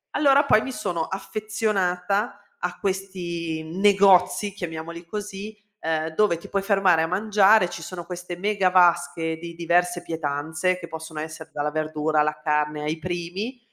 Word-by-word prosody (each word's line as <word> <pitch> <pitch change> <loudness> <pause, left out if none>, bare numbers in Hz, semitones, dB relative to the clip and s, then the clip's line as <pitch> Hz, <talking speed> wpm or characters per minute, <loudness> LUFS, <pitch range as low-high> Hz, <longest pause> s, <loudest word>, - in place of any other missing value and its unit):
Allora 280 0 +5
poi 220 - +5
mi 265 - -4
sono 175 -9 -2
affezionata 205 -1 -1 0.2
a - - -3
questi 175 -5 -3
negozi, 195 +3 +4
chiamiamoli 170 -2 -6
così, 210 +2 -6 0.2
ehm, 160 0 -1
dove 210 -4 +3
ti 170 - -11
puoi 200 - -1
fermare 195 -4 +3
a 160 - +1
mangiare, 205 +1 +4
ci 175 - -7
sono 175 -2 -7
queste 180 -1 -6
mega 200 0 +1
vasche 175 -2 +3
di 170 +1 -8
diverse 175 +1 +1
pietanze 160 +3 -1
che 170 - -8
possono 160 -1 -7
essere 155 +1 -7
dalla 145 0 -1
verdura, 155 0 0
alla 150 0 0
carne, 150 -1 0
ai 155 +2 -2
primi, 180 +8 -4
175 Hz, 150 wpm, -24 LUFS, 160-195 Hz, 0.2 s, Allora